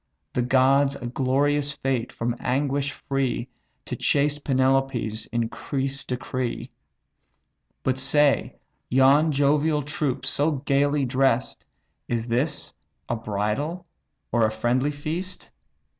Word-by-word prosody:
The 125 - +1
gods 135 +2 +3
a 120 - -7
glorious 140 +3 +1
fate 130 -4 -2
from 120 +1 -2
anguish 140 +2 0
free 135 -3 -2 0.4
To - - -4
chaste 145 0 +1
Penelope's 130 -5 +1
increase 135 +4 -2
decree. 125 -1 -3 1.1
But 130 0 0
say, 145 +2 +2 0.3
yon 135 +5 +5
jovial 145 +2 +2
troops 140 -2 -2
so 150 +2 +2
gaily 140 0 +2
dress'd, 130 -1 +1 0.4
Is 115 -1 -2
this 135 +6 -1 0.3
a 120 - -1
bridal 115 - -2 0.5
or 120 -1 +3
a 110 - +4
friendly 120 +5 0
feast? 155 +6 -5
135 Hz, 110 wpm, -25 LUFS, 125-145 Hz, 1.1 s, yon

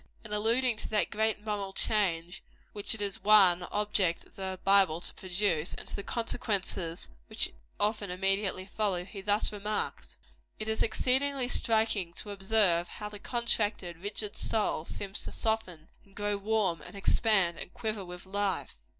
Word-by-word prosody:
In 210 - -6
alluding 230 +3 +2
to - - -5
that 210 - +1
great 220 0 0
moral 200 -2 -2
change 180 -5 +1 0.3
which 205 +1 0
it 210 - -2
is 200 -2 -3
one 195 -4 +7
object 205 -4 +1
of - - -23
the 190 -1 -4
Bible 195 -5 +5
to - - -6
produce, 180 -3 0
and - - -6
to - - -4
the - - -4
consequences 200 -7 -1 0.2
which - - -2 0.3
often 210 -1 0
immediately 195 +1 0
follow, 195 -3 -1
he 195 0 -8
thus 205 +2 +1
remarks: 210 +1 -3 0.4
"It 215 - -5
is 220 0 0
exceedingly 260 +3 +2
striking 220 -7 +1
to 205 - -6
observe 195 -3 +3
how 210 +3 -7
the 210 -1 -9
contracted, 210 -7 0
rigid 205 +3 -2
soul 210 -7 0
seems 200 +2 -3
to - - -6
soften, 185 -8 -1
and 195 -1 -23
grow 205 0 0
warm, 200 -4 0
and - - -11
expand, 195 -3 +2
and - - -7
quiver 215 -3 -3
with 180 0 -9
life. 195 - -2
205 Hz, 160 wpm, -30 LUFS, 185-215 Hz, 0.4 s, one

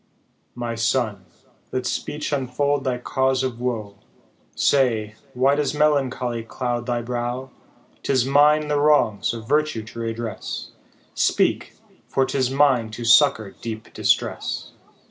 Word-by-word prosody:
" - - -43
My 115 - -2
son, 115 -3 -1 0.5
let 130 -1 -2
speech 150 +4 -3
unfold 140 +1 0
thy 125 -2 0
cause 130 +1 0
of 120 -2 -3
woe, 110 -5 -3 0.6
Say, 115 -6 +2 0.2
why 135 +3 +3
does 145 -1 0
melancholy 135 -5 +1
cloud 120 +1 -3
thy 120 -1 -1
brow? 125 +2 -3 0.5
'Tis 130 -3 +1
mine 150 +2 +4
the 145 -1 +1
wrongs 145 -9 +3
of 115 -2 -7
virtue 150 -6 +1
to 110 +2 -10
redress; 115 -2 -5 0.4
Speak, - - +1 0.3
for 135 - +1
'tis 130 -2 0
mine 135 -4 +3
to 115 +2 -7
succour 120 -4 +5
deep 110 -1 -7
distress." - - -1
125 Hz, 130 wpm, -23 LUFS, 115-140 Hz, 0.6 s, succour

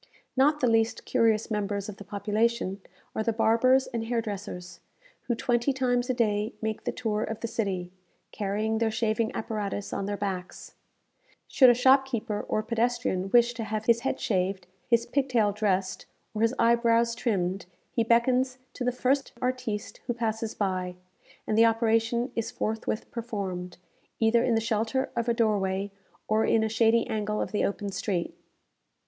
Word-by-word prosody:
Not 295 +3 +3
the 250 - +3
least 225 0 +1
curious 225 -2 +2
members 205 -1 -2
of 205 -2 -7
the - - -9
population 205 0 -1 0.3
are - - 0
the 230 - +1
barbers 235 +4 +3
and 230 -2 -4
hair 235 0 0
dressers, 195 -5 -6 0.5
who 240 - +1
twenty 240 +3 +1
times 245 -1 0
a - - +3
day 215 -2 0
make 220 -1 -3
the - - 0
tour 215 -3 -2
of 225 - -4
the 230 - -2
city, 190 -6 -2 0.4
carrying 215 +2 -1
their 225 -1 +2
shaving 220 0 0
apparatus 210 -3 -3
on 195 - -2
their 205 0 -2
backs. 190 -3 -5 0.7
Should 260 -3 +6
a 240 - +6
shopkeeper 250 -4 +2
or 215 - 0
pedestrian 230 -4 0
wish 240 +2 +4
to 230 -1 -5
have 215 0 -3
his 235 0 +4
head - - -2
shaved, 190 -2 -1 0.2
his 235 -1 +3
pig 270 +2 0
tail 220 -5 +3
dressed, 195 -2 -1 0.3
or 215 - -3
his 230 +3 +2
eyebrows 235 0 +3
trimmed, 195 -6 -1 0.2
he 230 - +1
beckons 250 +3 +2 0.2
to 255 - -5
the 250 - +2
first 260 +3 0
artiste 250 -5 -3
who 240 - -1
passes 225 -1 -2
by, 185 -3 -2 0.5
and 215 - 0
the 225 +1 +6
operation 225 +2 +2
is 225 -1 -2
forthwith 220 -2 -3
performed, 195 -6 -4 0.4
either 230 +1 +4
in 240 - +2
the 225 - +2
shelter 225 +3 -1
of 235 0 -1
a - - +3
doorway, 200 -3 0 0.4
or 215 +1 +2
in 220 0 +3
a 220 - 0
shady 225 +1 +3
angle 210 -1 -2
of - - -2
the 210 - 0
open 200 0 -2
street. 185 -3 -2
225 Hz, 170 wpm, -27 LUFS, 205-235 Hz, 0.7 s, Should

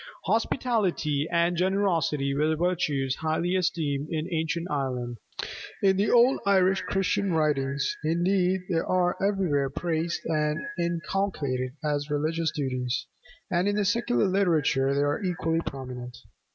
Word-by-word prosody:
Hospitality 195 - 0
and 170 +1 +2
generosity 170 -7 +1
were 155 +3 +1
virtues 150 -6 0
highly 160 +3 0
esteemed 160 -6 0
in 155 -1 -2
ancient 165 +1 -1
Ireland; 125 -4 -2 0.6
in 190 -1 +5
the 200 +2 +1
old 245 +2 +5
Irish 190 -1 +3
Christian 195 -1 0
writings 140 -3 0
indeed 180 +3 +2
they 170 -4 +1
are 180 +1 +1
everywhere 180 -9 +1
praised 165 +3 -2
and 150 -1 0 0.2
inculcated 170 -7 -1
as 145 -1 -1
religious 155 +3 0
duties; 130 -3 -2 0.5
and 180 +2 +2
in 205 - +1
the 210 -1 +1
secular 235 +3 +2
literature 160 -8 +2
they 140 - +2
are 145 0 0
equally 165 -3 0
prominent. 125 -2 -6
165 Hz, 125 wpm, -27 LUFS, 145-185 Hz, 0.6 s, in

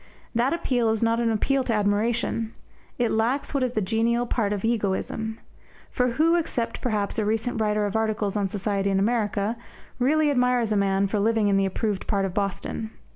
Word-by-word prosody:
That 240 +3 +2
appeal 250 -8 +1
is 220 0 0
not 230 0 +2
an 235 -1 +1
appeal 265 +5 +1
to 240 - -1
admiration 220 +2 0 0.4
it 240 -2 +1
lacks 240 +8 0
what 275 - +1
is 250 -1 0
the 215 - 0
genial 230 +4 +1
part 225 -4 0
of 205 0 -2
egoism. 220 0 -1 0.5
For 250 -1 +1
who, 320 +6 +3
except 245 -8 -2
perhaps 215 -2 -1
a - - +1
recent 225 +2 -1
writer 210 -1 +1
of 205 - -3
articles 215 -2 0
on 205 -2 +1
society 200 0 -1
in 195 - +1
America, 210 0 0 0.4
really 295 +4 +3
admires 250 -3 +2
a - - +2
man 195 -1 +2
for 205 +1 -1
living 220 0 +2
in 195 - +3
the 195 0 +2
approved 205 0 -2
part 200 -2 +1
of 190 - -4
Boston? 200 +2 -3
220 Hz, 190 wpm, -25 LUFS, 205-240 Hz, 0.5 s, who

